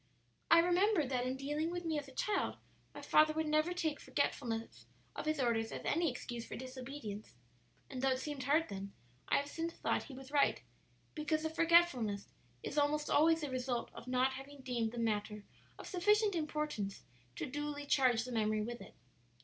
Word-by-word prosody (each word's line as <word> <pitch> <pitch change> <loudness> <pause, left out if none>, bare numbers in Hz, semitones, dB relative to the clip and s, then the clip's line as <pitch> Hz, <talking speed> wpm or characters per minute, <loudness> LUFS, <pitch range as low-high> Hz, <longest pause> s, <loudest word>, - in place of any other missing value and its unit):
"I - - +8
remember 355 +1 +4
that 255 -1 -1
in 255 - -1
dealing 295 +4 -1
with 350 0 -4
me 315 -2 0
as 285 - -9
a - - -11
child 410 +10 -1 0.4
my - - -8
father 310 0 +5
would 315 0 0
never 310 +3 +2
take 320 -4 -1
forgetfulness 230 -5 -2 0.3
of - - -4
his 310 -1 +1
orders 230 -3 +1
as - - -6
any 335 +1 +2
excuse 240 -2 -5
for - - -7
disobedience; 255 - -7 0.5
and 255 - -5
though 270 - +3
it 260 - +2
seemed 280 -2 -4
hard 310 +4 +3
then, 195 0 -6 0.4
I - - +4
have 285 - -1
since 330 +3 -3
thought - - -1
he 270 - -10
was 270 +1 -10
right, 290 -1 +3 0.5
because 310 0 -1
the 315 - -1
forgetfulness 325 - +3 0.3
is 295 - -1
almost 295 +1 +1
always 325 +2 +5
the 295 -3 -3
result 250 -2 -2
of 235 - -10
not 255 +1 +2
having 270 +1 -9
deemed 240 -4 -1
the 240 - -8
matter 210 -2 -1 0.3
of - - -9
sufficient 415 +3 +3
importance 300 - -2 0.3
to - - -3
duly 290 +1 -4
charge 255 -5 +3
the 250 - -6
memory 215 -2 +1
with 240 +2 -5
it. - - -12
280 Hz, 190 wpm, -35 LUFS, 245-310 Hz, 0.5 s, I